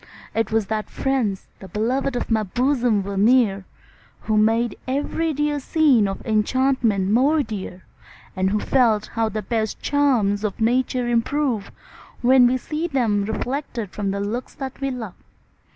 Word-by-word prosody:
'Twas 225 -1 +1
that 215 +1 -3
friends, 245 -8 -1
the 190 - -10
beloved 250 +6 -1
of 245 - -3
my 220 -1 +3
bosom, 240 0 +1
were 200 +1 -5
near, 205 -3 +3 0.6
Who 215 - -1
made 225 +2 +2
every 290 +4 -1
dear 295 0 -1
scene 275 -7 +3
of 195 0 -6
enchantment 220 -3 +1
more 285 +7 +3
dear, 190 -5 -7 0.5
And 190 0 +1
who 210 +2 0
felt 225 -4 +2
how 225 -1 0
the 215 0 -4
best 220 0 -2
charms 240 -9 +1
of 210 0 -3
Nature 250 +2 +1
improve, 240 -2 0 0.5
When 250 0 +6
we 255 +1 +1
see 305 +6 -3
them 225 -9 +1
reflected 235 -2 -4
from 205 -1 -3
looks 205 +5 -3
that 265 0 -7
we 275 - 0
love. 230 -7 -6
230 Hz, 150 wpm, -22 LUFS, 210-265 Hz, 0.6 s, When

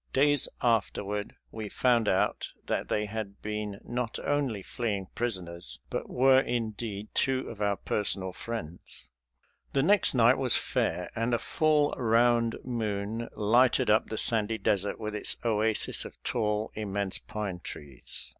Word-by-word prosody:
Days 145 0 +4 0.2
afterward 105 -3 0 0.2
we 110 -2 -6
found 120 -3 +2
out 95 - +1 0.2
that - - -1
they 105 - 0
had 105 -1 -5
been 105 -1 -4
not 120 -1 -3
only 135 -9 0
fleeing 105 -4 -2
prisoners, 85 - -3
but - - -3
were, 130 +1 +5
indeed, 110 -4 -3
two 130 -1 +1
of 110 -3 -8
our 100 -1 +2
personal 95 -3 0
friends. 90 -7 -7 0.6
The 135 - +2
next 200 -3 +4
night 120 +2 +5
was 130 -3 +3
fair, 90 - -1
and 115 +2 +1
a - - +2
full 150 +2 +2
round 115 0 +3
moon 110 -2 -3
lighted 120 +2 +3
up 110 - +3
the 110 - -4
sandy 110 -1 +4
desert 100 -2 0
with 105 -1 -4
its 105 - 0
oasis 110 -1 +1
of - - -10
tall, 105 -2 -1
immense 100 -2 -2
pine 100 -4 -5
trees. 75 -6 -7
110 Hz, 145 wpm, -29 LUFS, 100-120 Hz, 0.6 s, were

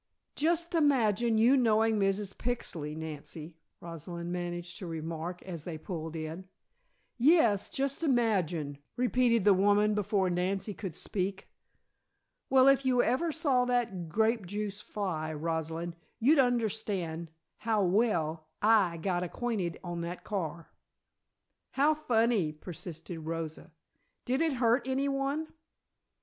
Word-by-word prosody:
"Just 340 +2 +1
imagine 240 - +3
you 235 +5 +5
knowing 225 -3 +3
Mrs. 195 0 0
Pixley, 165 -11 -3
Nancy," 160 +1 -6 0.2
Rosalind 170 +1 -6
managed 175 0 -4
to 185 - -6
remark 165 +2 -5
as 170 -5 -7
they 165 -2 -5
pulled 160 -1 -6
in. 160 +4 -6 0.7
"Yes, 235 - +4
just 275 +1 -2
imagine!" 185 - +1 0.2
repeated 245 -3 +2
the 205 0 +6
woman 205 +2 +3
before 200 -2 +1
Nancy 190 +3 -1
could 190 -5 -6
speak. 190 +1 -3 1.0
"Well, 265 0 +6
if 275 0 +5
you 255 -2 +3
ever 320 +6 +1
saw 285 -6 +2
that 230 -9 -1
grape 220 +1 +1
juice 205 +1 -4
fly, 170 -7 -3
Rosalind, 165 +2 -3 0.2
you'd 280 +6 +5
understand 210 -9 0 0.3
how 220 -2 +1
well 170 -6 +1
I 205 -6 +4
got 175 +1 -1
acquainted 180 -2 -2
on 175 -1 -4
that 170 +1 -5
car!" 170 -5 -4 1.0
"How 290 +3 +4
funny!" 230 - +1
persisted 165 +1 -8
Rosa. 160 0 -5 0.5
"Did 260 +4 +1
it 325 -3 +2
hurt 240 0 +2
anyone?" 275 +3 -1
200 Hz, 120 wpm, -30 LUFS, 170-240 Hz, 1.0 s, the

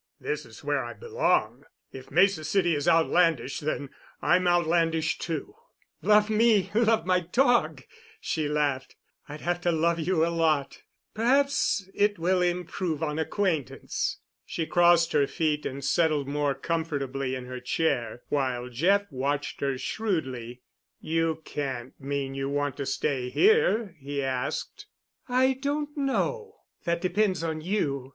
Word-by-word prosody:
"This 435 0 -4
is - - -14
where - - 0
I - - -6
belong. 470 +1 0 0.3
If 130 -1 -10
Mesa 175 +1 +3
City 175 +1 +2
is 145 +1 -2
outlandish, 165 -5 +3
then 145 -3 -3 0.3
I'm 180 0 +3
outlandish, 165 -2 +2
too." 170 - -4 0.5
"Love 210 0 +4
me, 220 -2 +3
love 225 -4 +3
my 185 0 +3
dog," 240 +8 +2 0.4
she 155 -2 -2
laughed. 145 -3 -1 0.3
"I'd 150 +1 -8
have 175 0 -1
to 175 - +1
love 170 +1 +1
you 165 0 +2
a 170 - -2
lot. 155 -4 +1 0.3
Perhaps 250 -4 +2
it 205 0 +2
will 180 +2 +1
improve 175 -2 -1
on 150 0 -2
acquaintance." 160 -4 -1 0.3
She 165 - -3
crossed 175 0 +4
her 145 -2 +3
feet 155 -2 -1
and 135 0 -6
settled 155 -2 +2
more 145 -1 0
comfortably 140 -4 -2
in 130 -1 -6
her 125 0 -6
chair, 125 -4 -1
while 130 -3 -1
Jeff 185 +11 +2
watched 140 +2 -2
her 140 -2 0
shrewdly. 130 - -3 0.4
"You 160 0 -1
can't 130 -4 -4
mean 140 0 -3
you 135 0 -3
want 145 0 -1
to 140 -2 -4
stay 135 -2 -1
here?" 235 - +3
he 140 0 -3
asked. 130 0 -3 0.4
"I 260 +1 +3
don't 290 +1 -2
know. 435 - -1 0.3
That 170 0 0
depends 185 -1 +1
on 160 -1 -2
you. 145 -8 -1
160 Hz, 145 wpm, -27 LUFS, 140-190 Hz, 0.5 s, Love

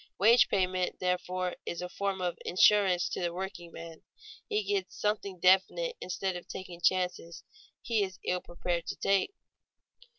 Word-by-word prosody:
Wage 230 +5 +6
payment, 185 -1 0
therefore, 180 0 -1
is 170 - -4
a 180 - -3
form 195 +1 -3
of 175 -1 -1
insurance 185 -1 +4
to - - -4
the 175 -1 0
workingman; 170 -3 -7 0.5
he 425 -1 +1
gets 400 -2 -2
something 205 -3 -1
definite 190 - +3
instead 185 0 -2
of 175 - -8
taking 175 -2 -8
chances 180 -1 0 0.4
he 230 -3 +1
is 190 -2 -3
ill 180 0 0
prepared 175 0 -3
to - - -3
take. 195 - +1
185 Hz, 145 wpm, -30 LUFS, 180-200 Hz, 0.5 s, Wage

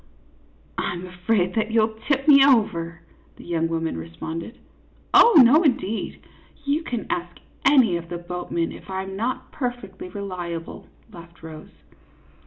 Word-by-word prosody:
" 65 +4 -33
I - - -1
'm 175 +1 -7
afraid 180 +1 -1
that 220 -1 0
you 225 0 +3
'11 220 0 -3
tip 275 -1 0
me 280 -2 +8
over," 175 -11 +2 0.3
that - - -14
young 165 -1 -1
woman 165 - -2
responded. 160 - -7 0.3
" - - -33
Oh, 470 -9 +8
no, 290 +7 +6
indeed! 255 - -1 0.4
You 285 +3 +1
can 245 -8 -4
ask 175 0 -4 0.3
any 255 -11 +5
of 170 0 -9
the 175 - -4
boat 175 +1 -7
men 165 -1 -1
if - - -12
I 190 0 -3
'm 190 0 -7
not 235 +6 -3
perfectly 245 -9 -5
reliable," 175 -4 -6 0.3
laughed 170 -1 -14
Rose. 160 -1 -10
185 Hz, 165 wpm, -23 LUFS, 170-235 Hz, 0.4 s, me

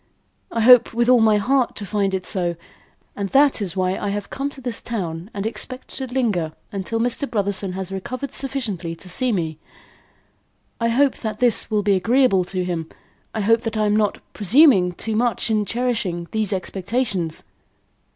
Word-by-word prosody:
I 230 - -1
hope 245 0 +7
with 240 +1 +2
all 250 -1 +7
my 220 -2 +4
heart 250 +4 +1
to 205 - -6
find 200 -1 0
it 185 -1 -4
so, 175 -3 -1 0.6
and 200 -1 -3
that 275 -1 +4
is 190 -2 -2
why 185 0 0
I 205 - -2
have 205 0 -4
come 275 +1 -2
to 280 - -13
this 245 -4 -4
town 175 -5 -4
and 200 0 -4
expect 255 +3 -4
to 265 - -4
linger 215 -11 -1 0.3
till 225 +3 -2
Mr. 245 +4 -1
Brotherson 200 -4 -1
has 190 0 -5
recovered 250 +8 -5
sufficiently 230 -13 -4
to 175 - -13
see 250 +7 +1
me. 160 -6 -2 1.2
I 230 0 +1
hope 265 +3 +2
that 215 -2 -5
this 245 -2 +2
will 210 -2 +1
be 200 0 +3
agreeable 200 -1 +3
to 180 0 -2
him. 165 -3 -3 0.5
I 220 - -1
hope 225 +3 +3
that 225 -2 -3
I 215 - +2
am 210 0 +2
not 210 -2 +1 0.2
presuming 210 - +5
too 220 +5 -3
much 235 0 0
in 210 -1 +1
cherishing 220 -8 -2
these 215 -2 0
expectations." 190 -2 -2
215 Hz, 180 wpm, -22 LUFS, 190-245 Hz, 1.2 s, hope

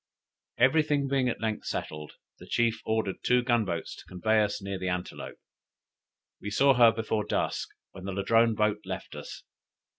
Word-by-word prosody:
Every 135 +6 +5
thing 145 -2 0
being 135 -2 +1
at 115 - -4
length 110 -1 -2
settled, 75 -1 -5 0.3
the - - -12
chief 115 -1 +1
ordered 110 -3 -1
two 125 0 +3
gun 120 -3 +2
boats 85 -3 -4
to - - -13
convey 110 +4 +1
us 105 -1 -1
near 100 -1 -5
the 95 0 -2
Antelope; 90 0 -5 1.0
we 105 - -4
saw 135 +6 +4
her 120 -2 +7
just 115 - -2
before 110 -1 -1
dusk, 105 - -2 0.2
when 95 - -10
the 95 - -3
Ladrone 115 +4 +3
boats 105 0 0
left 95 0 -6
us. - - -9
110 Hz, 180 wpm, -28 LUFS, 95-120 Hz, 1.0 s, her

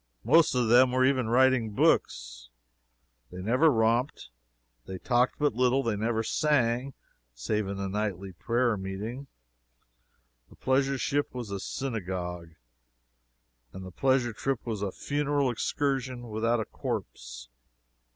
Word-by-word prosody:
most 165 -5 +4
of 125 -2 +1
them 125 +2 +5
were 130 0 +3
even 130 -4 +1
writing 130 -2 +3
books. - - 0 0.8
They 90 - -8
never 125 - +3
romped, 115 - 0 0.6
they 95 - -6
talked 125 +5 +1
but 145 -4 +1
little, 125 +3 +2
they 115 -4 -1
never 110 +2 -1
sang, 130 -2 0 0.4
save 105 - -2
in 100 0 -4
the 100 0 -3
nightly 100 -1 -3
prayer 115 +6 0
meeting. 105 +8 -6 1.2
The - - -17
pleasure 135 +1 +1
ship 145 +1 -1
was 120 -5 -6
a 100 - -3
synagogue, 90 -9 -5 1.2
and 95 0 -8
the 95 - -9
pleasure 130 +2 +1
trip 135 +2 -3
was 110 -4 -4
a 100 -2 -2
funeral 145 0 -1
excursion 130 0 -2
without 115 +2 0
a 110 - -2
corpse. - - -6
120 Hz, 130 wpm, -28 LUFS, 100-130 Hz, 1.2 s, them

